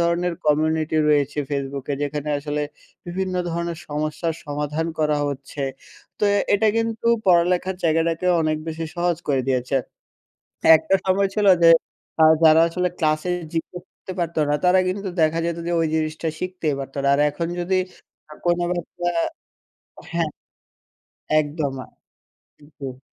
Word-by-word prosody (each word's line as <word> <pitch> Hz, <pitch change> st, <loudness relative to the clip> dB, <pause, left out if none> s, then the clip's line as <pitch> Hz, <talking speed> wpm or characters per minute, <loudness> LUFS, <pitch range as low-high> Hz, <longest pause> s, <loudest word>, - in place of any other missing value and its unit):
ধরনের 170 Hz, +1 st, +1 dB
কমিউনিটি 155 Hz, +1 st, +1 dB
রয়েছে 145 Hz, 0 st, +2 dB
ফেসবুকে, 140 Hz, 0 st, -3 dB
যেখানে 145 Hz, +1 st, -3 dB
আসলে 150 Hz, 0 st, -3 dB, 0.4 s
বিভিন্ন 185 Hz, +1 st, -3 dB, 0.2 s
ধরনের 170 Hz, 0 st, -3 dB
সমস্যার 155 Hz, +2 st, -2 dB
সমাধান 150 Hz, +2 st, -2 dB
করা 150 Hz, -1 st, +2 dB
হচ্ছে, 140 Hz, 0 st, -5 dB, 0.6 s
তো -, -, +1 dB, 0.3 s
এটা 215 Hz, +2 st, +3 dB
কিন্তু 225 Hz, 0 st, -1 dB, 0.2 s
পড়ালেখার 180 Hz, +1 st, +3 dB
জায়গাটাকে 165 Hz, +2 st, +1 dB
অনেক 155 Hz, -1 st, +1 dB
বেশি 160 Hz, 0 st, -4 dB
সহজ 175 Hz, -1 st, +1 dB
করে 135 Hz, -2 st, +2 dB
দিয়েছে। 130 Hz, +1 st, 0 dB, 1.0 s
একটা 160 Hz, +4 st, 0 dB
সময় 195 Hz, +1 st, +2 dB
ছিল 210 Hz, -1 st, +1 dB, 0.2 s
যে, 165 Hz, -, +8 dB, 0.8 s
যারা 160 Hz, +1 st, +7 dB
আসলে 180 Hz, +2 st, -1 dB
ক্লাস 155 Hz, -1 st, +2 dB
এ -, -, +1 dB, 0.2 s
জিজ্ঞেস 175 Hz, +2 st, -4 dB
করতে 185 Hz, -, -9 dB
পারতো 170 Hz, -1 st, -1 dB
না 145 Hz, -, +2 dB
তারা 180 Hz, +1 st, +5 dB
কিন্তু 195 Hz, +1 st, -3 dB
দেখা 160 Hz, +1 st, +3 dB
যেত 170 Hz, -1 st, -2 dB
যে, 175 Hz, -, -1 dB
ওই 165 Hz, -, +2 dB
জিনিসটা 155 Hz, +1 st, -1 dB
শিখতেই 180 Hz, -5 st, -2 dB
পারতো 135 Hz, +1 st, -7 dB
না। -, -, +3 dB
আর 145 Hz, -, +1 dB
এখন 165 Hz, +3 st, -3 dB
যদি 185 Hz, +2 st, 0 dB, 0.7 s
কোনো 175 Hz, 0 st, +2 dB
বাচ্চা 175 Hz, 0 st, -3 dB, 1.0 s
হ্যাঁ, 170 Hz, -2 st, 0 dB, 1.1 s
একদম। 145 Hz, -2 st, -2 dB, 1.1 s
জি। 130 Hz, -2 st, -7 dB
160 Hz, 135 wpm, -22 LUFS, 150-175 Hz, 1.1 s, যে